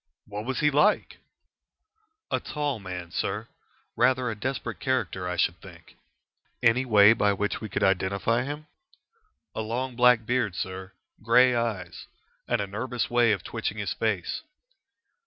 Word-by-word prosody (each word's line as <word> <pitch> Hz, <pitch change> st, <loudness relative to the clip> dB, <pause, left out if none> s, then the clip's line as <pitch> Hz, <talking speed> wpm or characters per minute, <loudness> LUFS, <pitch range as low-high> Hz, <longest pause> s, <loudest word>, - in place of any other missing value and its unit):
"What 105 Hz, +1 st, -6 dB
was 130 Hz, 0 st, -2 dB
he 150 Hz, 0 st, +4 dB
like?" 150 Hz, +9 st, +2 dB, 1.1 s
"A -, -, +1 dB
tall 145 Hz, -5 st, -3 dB
man, 90 Hz, -3 st, -7 dB
sir. 105 Hz, +5 st, -3 dB, 0.5 s
Rather 130 Hz, -2 st, +2 dB
a -, -, -5 dB
desperate 130 Hz, +5 st, -4 dB
character, 115 Hz, -9 st, -1 dB
I 90 Hz, -, -3 dB
should 85 Hz, -1 st, +1 dB
think." 85 Hz, -3 st, -14 dB, 0.7 s
"Any 120 Hz, +2 st, +4 dB
way 105 Hz, -2 st, +7 dB
by 105 Hz, -3 st, +2 dB
which 105 Hz, +1 st, -2 dB
we 110 Hz, -, -5 dB
could -, -, -1 dB
identify 100 Hz, +5 st, +1 dB
him?" 145 Hz, +4 st, -5 dB, 0.9 s
"A -, -, -3 dB
long 120 Hz, +3 st, -3 dB
black 125 Hz, -2 st, +5 dB
beard, 120 Hz, -6 st, 0 dB
sir. 95 Hz, +2 st, -5 dB, 0.3 s
Grey 125 Hz, +3 st, +5 dB
eyes. 105 Hz, -7 st, -3 dB, 0.4 s
And 120 Hz, -, +1 dB
a -, -, -1 dB
nervous 115 Hz, +5 st, -3 dB
way 120 Hz, -2 st, +4 dB
of 105 Hz, -, -1 dB
twitching -, -, -4 dB
his -, -, -2 dB
face." -, -, -2 dB
115 Hz, 150 wpm, -27 LUFS, 100-125 Hz, 1.1 s, way